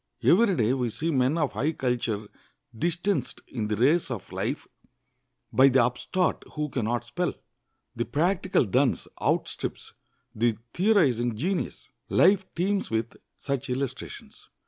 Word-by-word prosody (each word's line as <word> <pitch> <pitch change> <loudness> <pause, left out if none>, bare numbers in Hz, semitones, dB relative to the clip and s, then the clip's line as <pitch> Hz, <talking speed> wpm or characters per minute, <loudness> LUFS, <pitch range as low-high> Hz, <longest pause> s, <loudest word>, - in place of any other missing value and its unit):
Every 200 +1 +5
day 115 -3 +2
we 125 -3 0
see 160 +9 -2
men 130 +2 +2
of 150 -5 0
high 140 +10 0
culture 120 -6 -1 0.5
distanced 175 - -1
in 110 -4 -3
the 105 - 0
race 140 +10 +3
of 120 -7 -6
life - - -3 0.9
by 130 +4 +7
the 130 -2 +4
upstart 160 +8 -1
who 150 -1 -2
can 125 -4 -2
not 120 +1 -1
spell. - - -2 0.6
The 120 - -1
practical 175 +4 +1
dunce 125 +5 +1
outstrips - - -2 0.4
the 115 -1 +1 0.2
theorizing 140 - +3
genius. 180 - -2 0.2
Life 190 +1 +4
teems 195 +3 0
with 115 +1 -2 0.2
such 140 -2 -3
illustrations. 130 +1 -5
135 Hz, 135 wpm, -27 LUFS, 120-170 Hz, 0.9 s, by